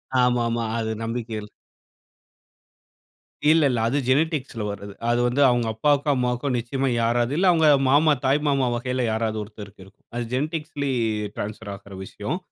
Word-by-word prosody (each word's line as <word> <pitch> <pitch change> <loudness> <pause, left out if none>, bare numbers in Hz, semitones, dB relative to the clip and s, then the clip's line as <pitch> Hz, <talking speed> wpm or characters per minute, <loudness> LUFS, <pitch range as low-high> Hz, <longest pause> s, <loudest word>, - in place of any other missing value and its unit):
அ, - - +4
ஆமாமா. 120 -1 +1
அது 110 -1 -2
நம்பிக்கை 115 -1 -4
இல் 105 - -11 2.0
இல்ல, 160 0 +5
இல்ல. 120 - 0
அது 135 +5 0
ஜெனடிக்ஸ்ல 140 -4 0
வர்றது. 100 0 -7 0.2
அது 120 - +2
வந்து 125 +4 0
அவங்க 120 -2 +1
அப்பாக்கோ, 145 +5 +1
அம்மாக்கோ 125 +2 -1
நிச்சயமா 130 +3 -1
யாராவது 120 +2 +1
இல்ல 185 +3 +2
அவங்க 160 -2 +3 0.2
மாமா, 150 +3 +5
தாய் 135 +3 +3
மாமா 135 -2 +2
வகையில 125 +1 -2
யாராவது 110 -1 -1
ஒருத்தருக்கு 105 -2 -11
இருக்கும். 95 +2 -22
அது 120 0 -2
ஜெனடிக்ஸ்ல 150 +2 -2 0.5
டிரான்ஸ்பர் 105 0 -5
ஆகிற 100 0 -12
விஷயம். 120 - -4
120 Hz, 150 wpm, -24 LUFS, 110-140 Hz, 2.0 s, இல்ல